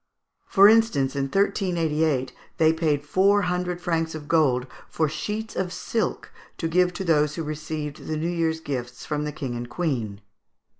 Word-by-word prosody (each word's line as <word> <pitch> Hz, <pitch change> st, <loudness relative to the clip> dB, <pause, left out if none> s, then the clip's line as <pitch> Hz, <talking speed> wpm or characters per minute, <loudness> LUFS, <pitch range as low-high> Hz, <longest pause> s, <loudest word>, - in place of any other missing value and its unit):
For 200 Hz, 0 st, +7 dB
instance, 210 Hz, -12 st, +3 dB
in 140 Hz, -1 st, 0 dB
1388 160 Hz, -5 st, 0 dB, 0.2 s
they 160 Hz, 0 st, +4 dB
paid 155 Hz, -3 st, 0 dB
four 200 Hz, +6 st, +3 dB
hundred 180 Hz, 0 st, -1 dB
francs 165 Hz, -2 st, -1 dB
of 150 Hz, -2 st, -8 dB
gold 135 Hz, -7 st, +3 dB, 0.2 s
for 155 Hz, -, +1 dB
sheets 210 Hz, +9 st, -4 dB
of 180 Hz, -1 st, -2 dB
silk 225 Hz, +3 st, -2 dB, 0.3 s
to 165 Hz, -, -2 dB
give 180 Hz, +2 st, +3 dB
to 190 Hz, -, -4 dB
those 150 Hz, -3 st, +2 dB
who 165 Hz, -, -3 dB
received 150 Hz, -1 st, -5 dB
the 155 Hz, -, -2 dB
New 160 Hz, +2 st, -1 dB
Year's 165 Hz, -2 st, -1 dB
gifts 125 Hz, -5 st, -5 dB
from 150 Hz, -1 st, -2 dB
the 150 Hz, -, -3 dB
King 135 Hz, -5 st, -5 dB
and 120 Hz, 0 st, -5 dB
Queen. 120 Hz, -, -2 dB
160 Hz, 165 wpm, -25 LUFS, 145-180 Hz, 0.3 s, For